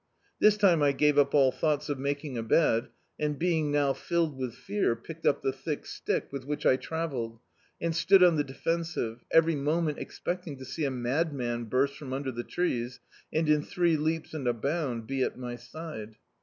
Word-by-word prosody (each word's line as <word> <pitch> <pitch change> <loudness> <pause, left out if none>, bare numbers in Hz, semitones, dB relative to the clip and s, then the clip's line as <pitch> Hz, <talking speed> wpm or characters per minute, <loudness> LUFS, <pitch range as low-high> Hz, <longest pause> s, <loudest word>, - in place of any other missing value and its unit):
This 210 0 +5
time 185 -6 +4
I 145 -1 +4
gave 150 +1 +3
up 140 +1 +3
all 135 -2 +6
thoughts 150 +1 0
of 145 -2 -2
making 140 0 -2
a 115 - -1
bed, 115 0 +2 0.3
and 150 -1 -1
being 160 -3 +1
now 145 -2 +2
filled 165 -2 -1
with 130 -3 -4
fear, 200 - 0
picked 160 +8 -6
up - - +2
the 135 - +2
thick 140 +3 -4
stick - - -2
with 140 -1 -5
which 145 +2 -4
I - - +6
travelled, 130 -7 -4 0.4
and 165 -1 -1
stood 180 +3 +6
on 175 -2 +6
the 145 - +2
defensive, 135 -4 -3
every 165 0 +5
moment 150 +1 0
expecting 175 -5 -4
to 130 - -9
see 155 +3 -3
a - - +1
madman 125 -2 -1
burst 135 +4 +1
from 135 -3 -6
under 135 0 -2
the 120 -1 -4
trees 125 -9 -2 0.3
and 160 0 +1
in 150 -1 +4
three 175 0 +1
leaps 160 +1 -1
and 145 -5 -3
a 120 - +3
bound 130 -2 -2
be 135 +2 -2
at - - 0
my 125 -1 -5
side. 120 -4 -8
145 Hz, 195 wpm, -29 LUFS, 130-165 Hz, 0.4 s, all